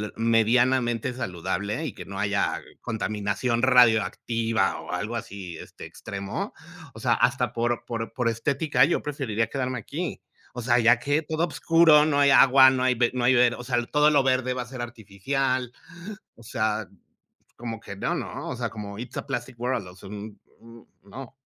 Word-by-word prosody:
medianamente 120 Hz, +2 st, +2 dB
saludable 100 Hz, -, -3 dB
y 125 Hz, -, -4 dB
que -, -, -10 dB
no 95 Hz, 0 st, -7 dB
haya 100 Hz, 0 st, 0 dB, 0.2 s
contaminación 110 Hz, +2 st, -2 dB
radioactiva 115 Hz, -3 st, +3 dB
o -, -, -9 dB
algo 105 Hz, +6 st, -3 dB
así, 95 Hz, -6 st, -8 dB
este, -, -, -12 dB
extremo, 100 Hz, +4 st, -6 dB, 0.4 s
o -, -, -11 dB
sea, -, -, +2 dB
hasta -, -, +1 dB
por 120 Hz, 0 st, -1 dB
por 115 Hz, -1 st, -5 dB
por 120 Hz, -1 st, 0 dB
estética, 140 Hz, +6 st, +1 dB
yo 170 Hz, -, 0 dB
preferiría 125 Hz, -7 st, -2 dB
quedarme 130 Hz, -3 st, -3 dB
aquí. 160 Hz, -, -5 dB, 0.3 s
O 125 Hz, -, -5 dB
sea, 120 Hz, +1 st, +3 dB
ya 115 Hz, +1 st, +5 dB
que 145 Hz, +4 st, 0 dB
todo 160 Hz, +2 st, -1 dB
oscuro, 165 Hz, -2 st, +5 dB
no 145 Hz, -2 st, +1 dB
hay 140 Hz, -, +5 dB
agua, 135 Hz, 0 st, +7 dB
no 130 Hz, -1 st, 0 dB
hay 130 Hz, -1 st, +2 dB, 0.2 s
no 125 Hz, -1 st, -1 dB
hay, 130 Hz, +1 st, +5 dB
o 120 Hz, 0 st, +3 dB
sea, 120 Hz, -2 st, 0 dB
todo 150 Hz, +1 st, +4 dB
lo 145 Hz, -3 st, +3 dB
verde 130 Hz, -1 st, +1 dB
va 125 Hz, -, -3 dB
a -, -, -6 dB
ser 125 Hz, +1 st, -10 dB
artificial, 120 Hz, +3 st, -2 dB, 0.6 s
o 115 Hz, -, -17 dB
sea, 110 Hz, -2 st, -2 dB, 0.7 s
como 115 Hz, -2 st, -6 dB
que 100 Hz, -, -9 dB
no, -, -, -1 dB
¿no?, -, -, -5 dB
o 125 Hz, -, -4 dB
sea, 120 Hz, -1 st, -3 dB
como 100 Hz, -2 st, -8 dB
it's 120 Hz, +3 st, -8 dB
a -, -, -4 dB
plastic 130 Hz, -3 st, -5 dB
world, 125 Hz, -4 st, -2 dB
o 90 Hz, -, -13 dB
sea, 95 Hz, -, -12 dB
un 105 Hz, 0 st, -9 dB, 0.2 s
un 115 Hz, 0 st, -15 dB, 0.2 s
no. 125 Hz, +6 st, -10 dB
120 Hz, 180 wpm, -25 LUFS, 110-130 Hz, 0.7 s, agua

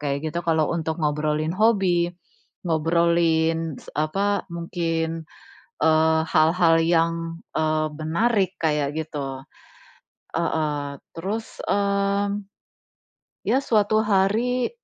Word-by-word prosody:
kayak 140 Hz, 0 st, -2 dB
gitu 170 Hz, -, -1 dB
kalau 160 Hz, -2 st, +2 dB
untuk 160 Hz, -1 st, -2 dB
ngobrolin 150 Hz, +1 st, 0 dB
hobi, 190 Hz, -4 st, +2 dB, 0.6 s
ngobrolin 165 Hz, -1 st, +1 dB
s -, -, -13 dB
apa, 195 Hz, +7 st, 0 dB
mungkin, 165 Hz, -1 st, -2 dB, 0.5 s
eee, 160 Hz, 0 st, +4 dB
hal-hal 165 Hz, +2 st, +4 dB
yang, 165 Hz, 0 st, +3 dB, 0.4 s
eee, 155 Hz, 0 st, +1 dB
menarik 185 Hz, +5 st, +1 dB
kayak 150 Hz, -3 st, +1 dB
gitu. 140 Hz, -4 st, -5 dB, 0.9 s
Heeh, 150 Hz, -4 st, -1 dB, 0.2 s
terus, 200 Hz, +7 st, -5 dB
mmm, 200 Hz, 0 st, 0 dB, 1.0 s
ya 260 Hz, -, +4 dB
suatu 215 Hz, -1 st, +2 dB
hari 220 Hz, +5 st, +1 dB
165 Hz, 95 wpm, -24 LUFS, 155-195 Hz, 1.0 s, eee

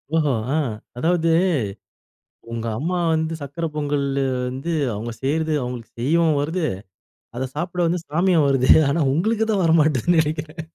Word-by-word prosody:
ஓஹோ! 150 Hz, -3 st, +2 dB, 0.2 s
ஆ. -, -, +2 dB, 0.4 s
அதாவது, 165 Hz, +3 st, +1 dB, 1.2 s
உங்க 115 Hz, 0 st, -4 dB
அம்மா 175 Hz, +5 st, -1 dB, 0.2 s
வந்து 160 Hz, 0 st, 0 dB
சர்க்கரை 160 Hz, +4 st, -4 dB
பொங்கல் 145 Hz, -1 st, 0 dB, 0.4 s
வந்து 135 Hz, +7 st, -4 dB, 0.2 s
அவங்க 115 Hz, +3 st, -5 dB
செய்றது 155 Hz, +3 st, 0 dB
அவங்களுக்கு 125 Hz, -2 st, -6 dB
செய்யவும் 155 Hz, +3 st, +2 dB
வருது. 165 Hz, +4 st, -1 dB, 0.7 s
அத 130 Hz, -, -2 dB
சாப்ட 175 Hz, +3 st, -2 dB
வந்து 175 Hz, +1 st, 0 dB
சாமியும் 170 Hz, 0 st, +2 dB
வருது. 135 Hz, -2 st, +3 dB, 0.2 s
ஆனா 155 Hz, +3 st, +1 dB
உங்களுக்கு 220 Hz, +7 st, +1 dB
தான் 195 Hz, -4 st, +1 dB
வரமாட்டேங்குதுன்னு 160 Hz, 0 st, +3 dB
நினைக்கிறேன். 155 Hz, +1 st, -4 dB
160 Hz, 135 wpm, -22 LUFS, 140-170 Hz, 1.2 s, வருது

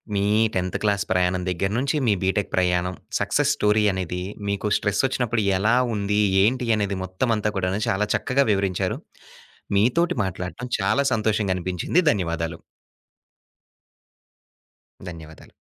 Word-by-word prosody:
మీ 100 Hz, -, +1 dB, 0.3 s
10థ్ 90 Hz, -1 st, -1 dB
క్లాస్ 100 Hz, -3 st, +1 dB
ప్రయాణం 90 Hz, 0 st, +1 dB
దగ్గర 95 Hz, +3 st, -1 dB
నుంచి, 135 Hz, +4 st, 0 dB
మీ 105 Hz, -, +4 dB
బీటెక్ 95 Hz, +1 st, 0 dB
ప్రయాణం, 90 Hz, 0 st, +1 dB, 0.2 s
సక్సెస్ -, -, +1 dB
స్టోరీ 105 Hz, +1 st, +2 dB
అనేది, 90 Hz, -1 st, -3 dB, 0.3 s
మీకు 100 Hz, +1 st, -1 dB
స్ట్రెస్ 105 Hz, -1 st, 0 dB
వచ్చినప్పుడు 120 Hz, -3 st, 0 dB, 0.2 s
ఎలా 110 Hz, +5 st, +2 dB, 0.2 s
ఉంది? 105 Hz, 0 st, 0 dB, 0.2 s
ఏంటి? 125 Hz, +3 st, +1 dB
అనేది 100 Hz, -2 st, -1 dB
మొత్తమంతా 105 Hz, +3 st, -1 dB
కూడాను 95 Hz, +1 st, -1 dB
చాలా 105 Hz, +2 st, 0 dB
చక్కగా 130 Hz, +6 st, +1 dB
వివరించారు. 95 Hz, -2 st, 0 dB, 0.8 s
మీతోటి 145 Hz, -, +2 dB
మాట్లాడటం 95 Hz, +7 st, -5 dB
చాలా 135 Hz, +9 st, +2 dB
సంతోషంగా 105 Hz, -3 st, 0 dB
అనిపించింది. 90 Hz, -, 0 dB
ధన్యవాదాలు. 85 Hz, -4 st, -3 dB, 2.5 s
ధన్యవాదాలు. 80 Hz, -2 st, -11 dB
100 Hz, 120 wpm, -23 LUFS, 90-110 Hz, 2.5 s, మీ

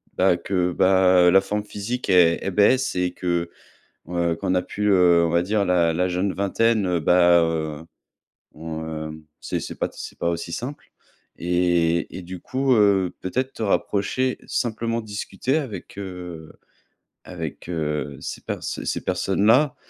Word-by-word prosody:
bah 90 Hz, -1 st, +3 dB
que 90 Hz, -2 st, -1 dB
bah, 95 Hz, -1 st, +4 dB
la 95 Hz, -, +6 dB
forme 105 Hz, +2 st, -3 dB
physique, 105 Hz, +5 st, -4 dB
elle 85 Hz, -3 st, +5 dB
elle 95 Hz, -, -2 dB
baisse 125 Hz, +7 st, +3 dB
et 90 Hz, 0 st, 0 dB
que, 85 Hz, -1 st, -2 dB, 0.6 s
heu, 85 Hz, -1 st, 0 dB
qu'on 90 Hz, -, -1 dB
a 90 Hz, -, +2 dB
pu, 105 Hz, -, -6 dB
heu, 90 Hz, -3 st, +5 dB
on 85 Hz, -, 0 dB
va 85 Hz, +1 st, +2 dB
dire 100 Hz, +3 st, 0 dB
la 90 Hz, -2 st, +3 dB
la 90 Hz, +3 st, 0 dB
jeune 90 Hz, +2 st, -1 dB
vingtaine, 105 Hz, +2 st, +1 dB
heu, 90 Hz, -2 st, +1 dB
bah, 85 Hz, +1 st, +5 dB
heu, 80 Hz, -2 st, -2 dB, 0.7 s
mmh, 80 Hz, -1 st, -6 dB, 0.2 s
c'est -, -, -5 dB
pas -, -, +1 dB
c'est -, -, -9 dB
pas 85 Hz, -, 0 dB
aussi 85 Hz, 0 st, -4 dB
simple 125 Hz, +12 st, -6 dB, 0.5 s
et 85 Hz, -1 st, +1 dB
et -, -, -6 dB
du 90 Hz, 0 st, -9 dB
coup, 130 Hz, 0 st, 0 dB
heu, 100 Hz, -4 st, +3 dB
peut-être 130 Hz, +8 st, -2 dB
te -, -, -5 dB
rapprocher 105 Hz, +5 st, 0 dB
simplement 115 Hz, 0 st, -2 dB
discuter 110 Hz, +6 st, -2 dB
avec, 110 Hz, -, -6 dB
heu, 90 Hz, -5 st, -7 dB, 0.7 s
avec, 85 Hz, -2 st, -7 dB
heu, 75 Hz, -4 st, -3 dB
ces -, -, -6 dB
per -, -, -3 dB
ces -, -, -3 dB
personnes-là, 115 Hz, +9 st, +2 dB
90 Hz, 155 wpm, -23 LUFS, 85-105 Hz, 0.7 s, la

